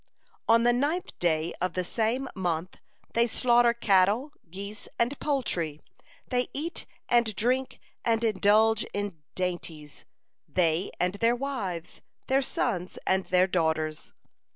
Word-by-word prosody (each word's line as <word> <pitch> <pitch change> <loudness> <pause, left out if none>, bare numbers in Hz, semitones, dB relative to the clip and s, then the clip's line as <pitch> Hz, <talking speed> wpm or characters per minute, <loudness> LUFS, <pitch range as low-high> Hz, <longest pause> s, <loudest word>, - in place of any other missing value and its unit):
"On 230 +1 +6
the 240 0 +4
ninth 295 +8 0
day 160 -1 +1
of 180 -1 0
the 185 - -1
same 230 +7 0
month 180 -2 -2 0.4
they 235 +1 +3
slaughter 240 0 +4
cattle, 215 +4 +3 0.2
geese, 200 +4 -7
and 245 +4 0
poultry, 175 - -1 0.5
they 250 -1 +1
eat 325 +5 -4 0.2
and 235 -3 +3
drink 255 +4 0 0.2
and 230 0 +1
indulge 215 +1 +4
in 200 -6 -3
dainties, 170 -5 -5 0.4
they 170 +1 +1
and 180 +1 +1
their 230 +1 +4
wives, 230 -11 -4 0.2
their 265 +1 +2
sons 195 -9 -2
and 190 0 +2
their 180 0 +4
daughters. 160 -4 -1
205 Hz, 130 wpm, -28 LUFS, 180-240 Hz, 0.5 s, On